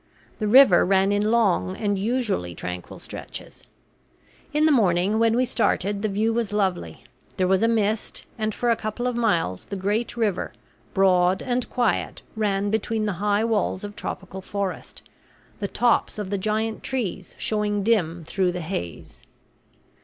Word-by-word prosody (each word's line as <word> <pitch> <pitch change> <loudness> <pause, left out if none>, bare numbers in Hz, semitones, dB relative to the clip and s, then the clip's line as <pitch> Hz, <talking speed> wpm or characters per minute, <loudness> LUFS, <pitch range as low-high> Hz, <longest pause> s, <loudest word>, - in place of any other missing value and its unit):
The 215 - 0
river 245 -5 +7
ran 195 +1 +3
in 205 +1 +1
long 195 - +2
and 205 -2 0
usually 210 - -1
tranquil 90 0 -6
stretches. - - -9 0.8
In 300 +1 +2
the 315 - +5
morning 200 -4 +3
when 230 0 +3
we 255 +1 +3
started 200 -4 0
the 215 - +1
view 215 +3 +1
was 230 -3 -1
lovely. 195 -4 -1 0.3
There 185 - +2
was 190 0 +3
a 225 - +4
mist, 220 -1 0
and 215 -1 -1
for 240 +3 0
a - - +4
couple 215 +3 -4
of 250 -1 0
miles 175 - 0
the 200 - -6
great 205 +5 -1
river, 210 -5 -1 0.4
broad 185 -1 +3
and 250 -1 -1
quiet, 240 -3 -1
ran 205 -2 0
between 220 0 0
the 205 - 0
high 205 +1 +2
walls 215 -4 0
of 205 0 -7
tropical 190 0 -6
forest, 200 -1 -5 0.6
the 200 - -2
tops 240 +2 +1
of 205 -2 -4
the 200 - 0
giant 215 +2 -1
trees 205 -8 -3
showing 210 -1 -1
dim 175 -7 +1
through 180 +2 0
the 180 - -4
haze. 120 - -6
205 Hz, 160 wpm, -24 LUFS, 190-225 Hz, 0.8 s, river